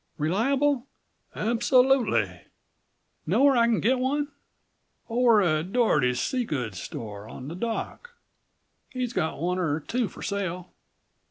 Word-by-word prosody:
"Reliable?" 255 - +1 0.5
"Absolutely." 235 - +2 0.9
"Know 210 - +3
where 280 -1 +6
I 235 -1 +4
can 230 -2 +2
get 250 +4 +2
one?" 285 +3 0 0.8
"Over 230 -3 +4
at 160 +1 0
Dorrotey's 145 - +2
sea 255 -2 0
goods 125 - -4
store 105 -1 -7
on 135 +2 -8
the 165 - -6
dock. 235 - -4 0.8
He's 250 -2 -3
got 165 -6 -1
one 180 +2 -1
er 160 -4 0
two 235 +8 -1
for - - -11
sale." 185 -3 -3
215 Hz, 125 wpm, -26 LUFS, 155-250 Hz, 0.9 s, where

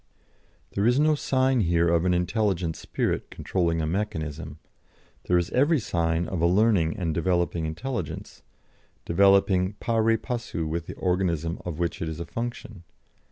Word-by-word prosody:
There 100 +3 +1
is 125 +3 +3
no 155 +1 +4
sign 130 -3 +1
here 85 -4 +2
of 85 +1 +2
an 90 - +3
intelligent 90 -3 0
spirit - - -2
controlling 85 -3 -1
a - - 0
mechanism; 80 -4 -3 0.7
there 90 - +3
is 85 -1 -1
every 145 +4 +3
sign 85 -5 0
of 90 -4 -3
a 85 - +4
learning 95 -2 +3
and 85 -5 -1
developing 85 -1 0
intelligence, 115 +10 -5 0.6
developing 95 +1 +4
pari 115 +1 +1
passu 115 -9 -4
with 85 +1 -3
the - - -7
organism 90 -3 -1
of 85 -4 -4
which 85 -1 -2
it 80 - -2
is 80 0 -6
a 85 - -4
function. 115 -2 -6
90 Hz, 155 wpm, -26 LUFS, 85-110 Hz, 0.7 s, no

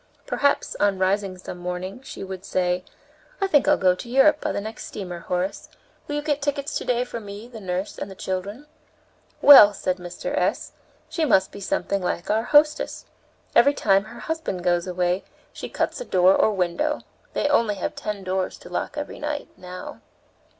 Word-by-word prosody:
Perhaps, 285 0 +1
on 200 -1 +2
rising 190 0 0
some 180 0 -8
morning, 180 +5 -5
she 270 - -8
would 190 -1 -7
say: 180 -2 0 0.6
"I 390 - +1
think 295 -7 +3
I'll - - +5
go 185 -1 +4
to 210 +6 -9
Europe 270 +4 +4
by - - -1
the - - -2
next 220 +2 -7
steamer, 180 -4 -6
Horace. 180 +2 -3 0.4
Will 290 - -3
you 295 - -2
get 295 -1 0
tickets 285 0 -2
to - - -7
day 245 0 +1
for 235 - -6
me, 205 +1 -9
the 240 -2 -10
nurse, 185 +1 -3
and 195 -1 -6
children?" 200 +8 -4 0.8
"Well," 210 -8 +10
said 185 -1 -1
Mr. 175 -1 -5
S., - - 0 0.4
"she 330 - -2
must 195 -10 +3
be - - -9
something 200 0 -1
like 180 0 -2
our 220 +2 +1
hostess. 300 +2 +3 0.5
Every 285 0 +6
time 195 +1 +3
her 220 +2 -11
husband 320 - -3
goes 175 0 +1
away 180 +1 0 0.3
she - - -7
cuts - - -2
a - - -5
door 185 - +5
or 220 - +3
window. 205 - -1 0.3
They - - -1
have 290 - +2
only 230 -7 +3 0.2
ten 210 -2 -4
doors 185 0 -2
to - - -13
lock - - -3
every - - -5
night, 295 -1 -4
now." 180 0 -9
200 Hz, 185 wpm, -24 LUFS, 185-270 Hz, 0.8 s, Well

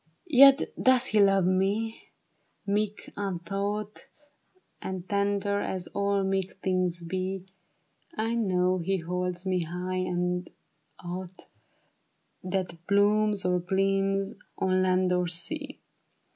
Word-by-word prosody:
121 275 +1 +7
" - - -40
Yet - - -6
does 260 -1 +5
he 215 -4 +2
love 195 -2 +4
me; 200 +5 0 0.6
meek, 205 +1 -2
untaught, 200 +2 -4 0.7
And 190 -1 -5
tender 200 0 0
as 185 -2 -3
all 200 0 +1
meek 190 -1 -2
things 185 -2 0
be, 185 +2 -3 0.7
I 225 +1 0
know 185 -5 +1
he 190 +3 0
holds 180 +1 -3
me 185 -1 +1
high 180 +2 -3
as 180 0 -1 0.6
aught 180 +1 -7 1.0
That 185 -2 -3
blooms 205 0 +3
or 180 0 +2
gleams 195 +2 0 0.2
on 185 0 +1
land 185 0 +2
or 180 0 +1
sea. 180 - -2
190 Hz, 115 wpm, -28 LUFS, 180-200 Hz, 1.0 s, 121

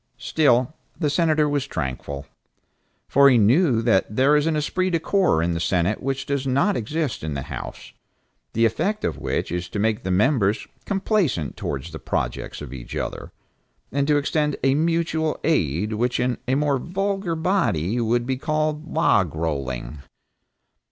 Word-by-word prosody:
Still 135 -2 +2 0.2
the 150 -4 0
Senator 155 -1 +2
was 145 -2 -1
tranquil, 70 - -4 0.8
for 140 0 +6
he 125 - +5
knew 120 - +4
that 105 -2 +2
there 135 +4 +4
is 150 +1 +2
an 160 - +1
esprit 185 +5 0
de 170 -2 +1
corps 175 - +2
in 85 0 0
the 85 - -2
Senate 90 +4 0
which 135 0 -2
does 140 -1 -2
not 140 +10 +2
exist 145 - -2
in 80 -2 -3
the 70 - -3
House, - - -8 0.6
the 115 +1 +3
effect 195 - 0
of - - -2
which - - -2
is 90 0 -3
to - - -5
make 110 +1 +1
the 95 - -4
members 105 +1 +2 0.2
complaisant 190 - 0
towards 70 +4 -4
the 80 - -7
projects - - -3
of 70 -3 -8
each - - -8
other, - - -4 0.6
and 140 +1 0
to 150 -1 +4
extend 150 0 0
a 135 0 +4
mutual 160 0 0
aid 105 - +1
which 120 +3 0
in 125 0 0
a 130 - +2
more 145 -1 +1
vulgar 195 +2 -2
body 125 - 0
would 120 +1 +1
be 130 0 -1
called 155 +1 -2
"log 100 - +2
rolling." 70 -5 -3
130 Hz, 165 wpm, -23 LUFS, 95-155 Hz, 0.8 s, for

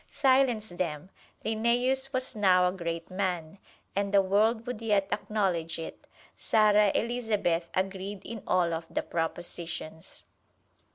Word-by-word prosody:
Silence 260 -6 +3
them 175 -1 -4 0.3
Linnæus 245 +4 +1
was 255 -1 -1
now 185 -3 +4
a - - +1
great 170 -2 -5
man, 185 -2 -2 0.4
and 200 0 0
the 200 -1 +6
world 220 +4 +2
would 245 -3 -5
yet 205 -3 +2
acknowledge 190 -6 -1
it. 165 - -8 0.3
Sara 210 -2 +4
Elizabeth 210 -8 0
agreed 190 +1 -3
in 225 -2 -6
all 175 -2 +2
of 165 0 -4
the - - -2
propositions. 165 -1 -5
200 Hz, 125 wpm, -29 LUFS, 175-225 Hz, 0.4 s, the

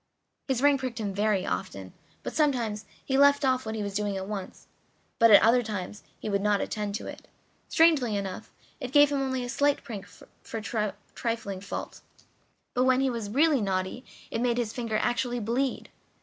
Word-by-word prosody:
His 265 -1 0
ring 285 -1 +5
pricked 255 -3 -4
him 205 -3 -2
very 205 -1 +1
often, 95 +1 -4 0.3
and - - -4
sometimes 240 -9 0 0.2
he 270 0 +1
left 285 0 +5
off 255 -2 +1
what 220 - -3
he 215 - -2
was 200 -1 -4
doing 205 -1 -1
at 190 0 -5
once; 200 -3 -6 0.5
but 230 - +7
at 205 - +8
other 235 +2 +5
times 210 -3 -5 0.2
he - - -6
would 200 -1 0
not 205 0 +2
attend 210 -2 -3
to - - -5
it. - - -9 0.4
Strangely 295 -10 +4
enough, 195 -2 -5 0.3
it 255 -4 -5
gave 290 0 +6
him 280 -1 0
only 260 -1 -1
a - - -4
slight 285 +3 +1
prick 220 -7 -7
for - - -11
a 215 -1 -2 0.2
trifling 225 -5 -3
fault, 200 - -6 0.7
but 250 +1 +2
when 260 0 +4
he 270 -1 +2
was 230 -4 -4
really 285 +3 +3
naughty 190 +4 -2 0.3
it 230 - -2
made 240 -1 +1
his 230 -3 -1
finger 230 -3 -2
actually 245 +1 0
bleed. 245 +5 -1
230 Hz, 190 wpm, -28 LUFS, 205-260 Hz, 0.7 s, at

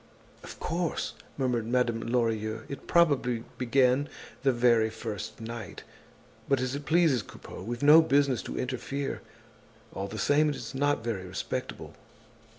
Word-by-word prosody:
"Of - - -10
course!" 170 0 -2 0.2
murmured 125 -4 0
Madame 120 -2 +1
Lorilleux, 110 -2 -1
"it 140 - -8
probably 135 -9 +3 0.2
began 130 +2 +3 0.3
the 135 - +3
very 120 -2 +3
first 110 -1 -6
night. 115 -2 -7 0.7
But 140 -2 +3
as 130 0 -1
it 140 0 -5
pleases 155 -7 +4
Coupeau, 95 - -11
we've 120 +6 -5
no 150 +3 +9
business 140 -4 +2
to - - -5
interfere. 135 +2 -3 0.7
All 100 +1 -4
the 110 - -7
same, 145 +7 +3
it's 125 -4 -5
not 145 -2 +1
very 100 -6 -3
respectable." 95 +1 -5
125 Hz, 140 wpm, -29 LUFS, 115-140 Hz, 0.7 s, no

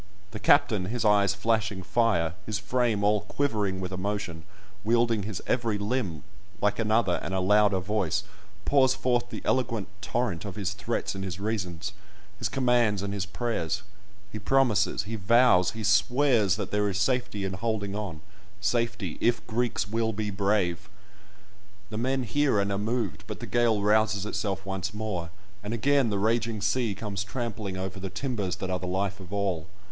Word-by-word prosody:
The 110 - -6
captain, 110 -9 +4
his 115 +4 -2
eyes 100 -2 +4
flashing 105 -2 0
fire, 100 -5 +2
his 110 -2 -1
frame 110 -1 0
all 105 0 +3
quivering 105 -5 -1
with 90 -1 -4
emotion—wielding 105 +4 -2
his 100 0 -5
every 115 -4 0
limb, 100 - -2 0.4
like 105 +1 +1
another 110 -4 +2
and 95 +3 -3
a - - +1
louder 105 +1 +4
voice, 95 -2 0 0.4
pours 130 -2 +4
forth 120 -1 0
the - - -7
eloquent 115 -6 0
torrent 110 -9 -1
of 100 -3 -6
his 100 -1 -2
threats 100 +4 -2
and 95 0 -5
his 95 -1 -4
reasons, 95 -4 -3 0.5
his 110 - -1
commands 120 -4 +2
and 100 0 -3
his 100 -1 -2
prayers; 100 -4 -2 0.5
he 110 - -5
promises, 105 -3 +2
he 110 +3 -5
vows, 110 -1 +4
he 110 - -4
swears 120 -2 +3
that 100 -3 -4
there 105 0 +2
is 95 - -2
safety 120 -2 0
in 95 - -3
holding 100 0 -2
on—safety, 105 +4 -3
if 120 0 +2
Greeks 115 -2 -1
will 115 +1 0
be 105 0 -2
brave! 100 -3 0 1.0
The 110 - -3
men 130 +2 0
hear 140 -1 +2
and 100 0 0
are 100 - -1
moved; 110 -6 -2
but - - -6
the - - -5
gale 115 -4 +2
rouses 105 -1 +3
itself 100 -2 -2
once 95 +1 -3
more, 100 -6 -3 0.3
and 105 +2 -3
again 135 +1 +3
the 100 - 0
raging 115 +1 +1
sea 110 0 0
comes 100 -1 -3
trampling 105 -3 -4
over 95 +1 -4
the 95 0 -4
timbers 100 -3 -2
that 95 -1 -4
are 90 - 0
the 90 - -5
life 95 +2 -1
of 90 -1 -11
all. 95 -5 -1
105 Hz, 170 wpm, -27 LUFS, 95-115 Hz, 1.0 s, captain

